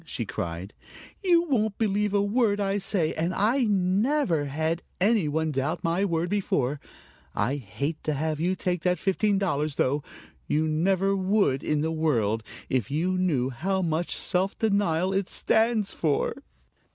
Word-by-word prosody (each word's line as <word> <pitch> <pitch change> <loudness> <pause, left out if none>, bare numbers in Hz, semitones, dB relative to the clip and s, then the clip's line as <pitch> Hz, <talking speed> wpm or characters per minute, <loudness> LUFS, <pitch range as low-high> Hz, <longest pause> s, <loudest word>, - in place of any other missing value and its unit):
she - - -4
cried. 85 +4 -5 0.5
"You 345 -3 +4
won't 220 - 0
believe 210 -1 +1
a 200 0 +2
word 205 -1 +1
I 200 0 0
say, 185 -4 0
and 170 +3 -1
I 235 +6 +2
never 200 - +1
had 160 +4 -1 0.2
any 200 -3 +3
one 160 +1 0
doubt 145 +5 -2
my 170 +4 +1
word 170 -2 0
before. 150 -8 0 0.6
I 120 +9 0
hate 140 +6 -4
to 155 - 0
have 155 +1 -1
you 180 +3 +1
take 180 -2 -2
that 180 0 +1
fifteen 200 +1 +1
dollars, 155 -6 -1
though. 145 +3 +1 0.5
You 155 +1 +1
never 190 +5 +1
would 190 -8 +2
in 150 -1 0
the 160 +1 0
world, 120 -10 +1 0.3
if 125 -6 -1
you 170 +6 0
knew 150 -9 +1
how 190 +9 -1
much 165 +1 -1
self 185 +2 0
denial 195 -4 +1
it 195 -1 -1
stands 220 -2 +1
for. 150 -4 0
180 Hz, 160 wpm, -26 LUFS, 150-200 Hz, 0.6 s, You